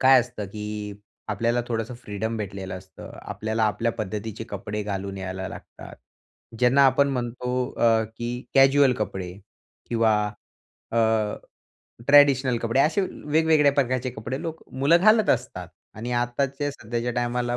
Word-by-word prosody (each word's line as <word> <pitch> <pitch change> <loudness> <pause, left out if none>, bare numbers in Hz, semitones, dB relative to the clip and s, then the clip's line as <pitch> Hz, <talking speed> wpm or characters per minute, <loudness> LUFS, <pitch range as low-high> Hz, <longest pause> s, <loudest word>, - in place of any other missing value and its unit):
काय 130 -1 +7
असतं, 120 -4 -6
की 105 0 -6 0.3
आपल्याला 115 +4 0
थोडंसं 115 +1 -3
फ्रीडम 110 +2 -3
भेटलेलं 95 -3 -5
असतं, 95 0 -13
आपल्याला 110 +1 -2
आपल्या 110 +3 0
पद्धतीचे 110 +1 -5
कपडे 105 -2 -4
घालून 100 -1 -4
यायला 95 0 -5
लागतात. - - -11 0.6
ज्यांना 125 +3 +5
आपण 140 +2 +3
म्हणतो, 125 0 -2
अ, 115 -1 +4
की 120 +2 -4
कॅज्युअल 135 0 +6
कपडे, 95 -4 -4 0.6
किंवा 115 -2 +3 0.8
अ, - - -1 1.1
ट्रेडिशनल 135 -4 +6
कपडे 115 +3 +2
असे 155 +7 +3
अ, - - +1 0.2
वेगवेगळ्या 155 -1 +4
प्रकारचे 130 -2 0
कपडे, 120 +3 -5
लोक 165 -2 -6
मुलं 140 +6 +4
घालत 215 +1 +5
असतात 120 -8 -2 0.3
आणि 115 +3 -6
आत्ताच्या 135 +4 -1
सध्याच्या 120 -1 -3
टायमाला, 120 0 -1
120 Hz, 135 wpm, -25 LUFS, 105-135 Hz, 1.1 s, काय